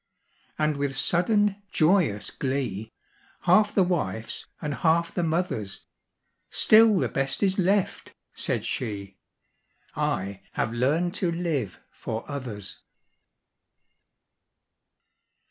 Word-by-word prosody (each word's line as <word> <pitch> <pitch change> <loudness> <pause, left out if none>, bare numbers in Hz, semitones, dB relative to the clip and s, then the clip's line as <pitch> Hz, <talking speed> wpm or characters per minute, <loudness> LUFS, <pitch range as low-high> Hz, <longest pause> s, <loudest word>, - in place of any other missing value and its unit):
And 150 -1 +1
with 140 -2 -2
sudden, 205 - +2
joyous 155 - +2
glee, 130 -6 -3 0.5
Half 210 +4 +4
the 195 - +5
wife's 115 - -2
and 150 -2 -3
half 170 +2 +1
the 175 - -1
mother's, 160 - -2 0.6
"Still 220 -1 +6
the - - +1
best 135 +7 -1
is 195 0 +2
left," 190 +1 0 0.2
said - - -1
she: 100 -5 -4 0.8
"I 95 +1 -2
have 110 - -1
learned 150 +9 +1
to 175 -3 +1
live 160 - -2
for 110 0 -6
others." 120 -9 -6
155 Hz, 100 wpm, -26 LUFS, 115-180 Hz, 0.8 s, Still